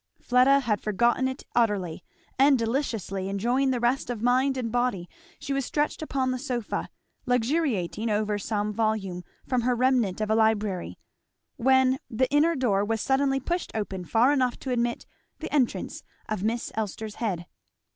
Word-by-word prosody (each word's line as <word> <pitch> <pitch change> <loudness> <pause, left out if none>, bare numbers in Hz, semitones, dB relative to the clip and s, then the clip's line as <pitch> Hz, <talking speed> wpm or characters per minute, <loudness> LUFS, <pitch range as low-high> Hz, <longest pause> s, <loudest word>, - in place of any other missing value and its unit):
Fleda 255 +3 +4
had 215 -6 0
forgotten 240 +5 +2
it 260 +1 -5
utterly, 205 -8 0 0.4
and 275 0 +6
deliciously 225 -6 -2
enjoying 240 +7 +1
the 255 -2 0
rest 240 +2 0
of 235 -3 -4
mind 260 +2 +2
and 235 -3 -2
body 245 -7 0 0.3
she 275 - -4
was 275 0 0
stretched 295 +5 -1
upon 265 -4 -1
the 255 - -2
sofa, 245 -5 -3 0.4
luxuriating 245 - 0
over 210 0 0
some 210 0 -2
volume 205 -5 -1 0.2
from 255 -2 +1
her 245 +1 +1
remnant 240 -6 +2
of 215 0 -1
a - - +4
library; 215 -4 +1 0.6
when 260 +1 +3
the 255 +3 +1
inner 310 +3 +3
door 215 -8 +1
was 225 +2 -1
suddenly 270 +2 +1
pushed 345 +6 -2
open 195 -4 -3
far 230 +9 +3
enough 255 -3 +1
to 265 - -5
admit 240 -1 -1 0.3
the - - -7
entrance 265 -5 0 0.3
of 215 -3 -3
Miss 230 +2 -1
Elster's 215 0 -4
head. 185 -7 -2
240 Hz, 160 wpm, -26 LUFS, 210-260 Hz, 0.6 s, and